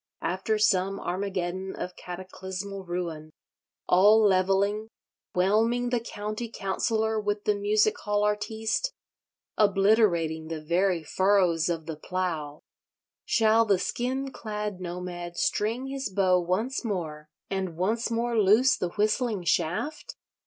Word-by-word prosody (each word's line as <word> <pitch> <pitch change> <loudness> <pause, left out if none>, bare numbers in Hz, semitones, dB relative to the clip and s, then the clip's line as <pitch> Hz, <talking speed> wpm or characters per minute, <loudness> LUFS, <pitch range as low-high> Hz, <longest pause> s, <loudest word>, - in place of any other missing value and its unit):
After 190 +4 0
some 195 -2 +2
Armageddon 185 0 -3
of 180 - -6
cataclysmal 190 +2 -7
ruin, 170 -3 -4 0.6
all 205 +5 +6
levelling, 200 +1 +2 0.5
whelming 225 +6 +2
the 245 - +2
County 215 0 -5
Councillor 220 +2 -1
with 205 0 -2
the 210 - +2
Music 210 +1 +2
hall 205 0 0
artiste, 220 - -1 0.7
obliterating 195 -6 +3
the 160 -1 -4
very 170 +2 +1
furrows 180 -1 +2
of 165 -2 -2
the 160 -2 -6
Plough, 160 -4 -3 0.6
shall 225 0 +4
the 205 -4 +3
skin 260 +7 -2
clad 210 -4 -5
nomad 175 -1 -6
string 230 +5 0
his 270 -3 -4
bow 185 -1 +3
once 190 +11 -1
more, 160 -8 -4 0.2
and 190 -4 -2
once 220 +7 0
more 235 +1 -1
loose 215 +6 +5
the 180 - -2
whistling 215 +1 0
shaft? 175 - -1
195 Hz, 120 wpm, -27 LUFS, 180-220 Hz, 0.7 s, all